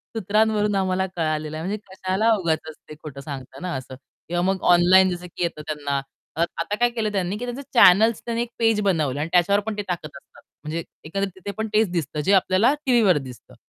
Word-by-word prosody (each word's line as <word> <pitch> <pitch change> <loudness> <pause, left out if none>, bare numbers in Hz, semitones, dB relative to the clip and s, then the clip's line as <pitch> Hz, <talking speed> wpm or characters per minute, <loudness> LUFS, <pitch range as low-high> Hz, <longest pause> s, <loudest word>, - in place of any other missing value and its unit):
सूत्रांवरून 210 0 +1
आम्हाला 190 -1 0
कळालेलं 155 -2 -2
आहे, 160 - -5
म्हणजे 205 +3 -2
कशाला 190 +4 0
उगाचच 160 -3 -2
ते 155 - -8
खोटं 140 -3 -8
सांगता 135 -3 -8
ना 180 -1 -4
असं 130 0 -7 0.3
किंवा 175 0 0
मग 190 0 0
ऑनलाईन 185 +2 +6
जसं 180 0 -5
की 175 - -2
येतं, 165 -3 -3
त्यांना 145 -2 -2 0.6
आता 170 +5 -2
काय 240 0 +4
केलं 225 -3 -2
त्यांनी 195 0 -2
की 245 - -5
त्यांचे 245 +3 -5
चॅनल्स 220 0 +6
त्यांनी 235 -1 -1
एक 240 - -3
पेज 225 -2 +3
बनवलं 155 -9 0
आणि 155 +3 -2
त्याच्यावर 200 +3 +4
पण 215 -1 -4
ते - - -1
टाकत 175 -4 -3
असतात. - - -19 0.2
म्हणजे 160 +2 -4 0.2
एकंदरीत 195 +4 -3
तिथे 190 +2 -6
पण 220 0 -2
तेच 215 -1 +3
दिसतं, 160 -4 -3
जे 195 +6 +2
आपल्याला 190 +7 +4
टीव्हीवर 230 - +4
दिसतं. 125 - -13
185 Hz, 200 wpm, -23 LUFS, 160-210 Hz, 0.6 s, ऑनलाईन